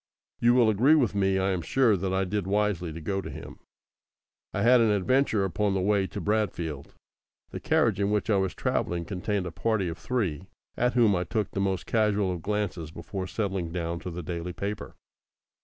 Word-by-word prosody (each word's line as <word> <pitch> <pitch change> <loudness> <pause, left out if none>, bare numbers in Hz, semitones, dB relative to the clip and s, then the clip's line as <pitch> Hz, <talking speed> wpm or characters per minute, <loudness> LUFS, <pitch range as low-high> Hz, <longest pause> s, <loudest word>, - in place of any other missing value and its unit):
You 120 +1 +4
will 120 -3 +5
agree 120 +9 +5
with 125 -10 +2
me, 95 -1 +2
I 95 +1 +1
am 90 -2 -1
sure, 120 +3 +3
that 95 0 -2
I 95 0 +1
did 95 0 -2
wisely 100 -4 0
to 80 - -7
go 95 +4 -2
to - - -7
him. - - -9 0.9
I 100 - -1
had 125 +1 +6
an 115 - +4
adventure 105 +2 +2
upon 95 +2 0
the - - +1
way 100 0 +2
to - - -6
Bradfield. 85 -9 -2 0.6
The - - -5
carriage - - +2
in 100 0 +1
which 105 -3 0
I 105 - +3
was 95 -1 -1
travelling 85 -1 -1
contained 95 +2 -2
a 90 - -4
party 110 +2 0
of 80 - -7
three, 95 -9 -2 0.3
at 125 +1 +1
whom 115 -5 +4
I 90 - 0
took 105 +1 -2
the 100 - -2
most 95 -2 -1
casual 105 -4 +1
of 85 - -6
glances 100 -5 -2
before 95 +3 -6
settling 95 -5 -2
down 85 -1 -3
to 90 - -6
the 90 0 -6
daily 85 +2 -4
paper. 100 +3 -5
95 Hz, 205 wpm, -27 LUFS, 90-105 Hz, 0.9 s, had